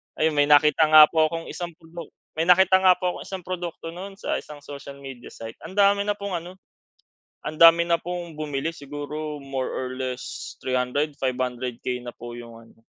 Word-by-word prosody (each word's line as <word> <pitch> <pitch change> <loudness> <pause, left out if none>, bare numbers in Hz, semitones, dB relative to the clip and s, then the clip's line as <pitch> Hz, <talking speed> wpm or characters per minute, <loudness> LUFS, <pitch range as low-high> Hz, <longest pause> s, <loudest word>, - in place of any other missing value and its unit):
Ayun, 160 0 +2
may 145 -1 +2
nakita 150 +1 +5
nga 155 0 +10
po 160 -1 +4
akong 165 0 -5
isang 175 -1 -5
produk 165 +1 -10 0.3
may - - +3
nakita 190 +1 +6
nga 185 - +8
po 180 -1 -1
akong - - -8
isang 190 -2 -6
produkto 175 -2 -5
nun 195 +2 -8
sa - - -2
isang 150 -1 -11
social 140 -1 -9
media 135 -3 -10
site, 115 0 -9
ang 165 - -8
dami 200 0 +4
na - - +3
pong 200 -2 -3
ano, 175 +2 -11 0.9
ang 155 - -4
dami 165 0 +8
na 170 - +4
pong 175 -1 -5
bumili 150 +1 -2
siguro 145 +1 -6
more 135 -1 -3
or 130 - -3
less 130 -1 -5
300, 130 +4 -1
500K 125 -1 -3
na - - -4
po 120 0 -9
yung 115 -1 -11
ano, - - -21
155 Hz, 190 wpm, -24 LUFS, 135-175 Hz, 0.9 s, nga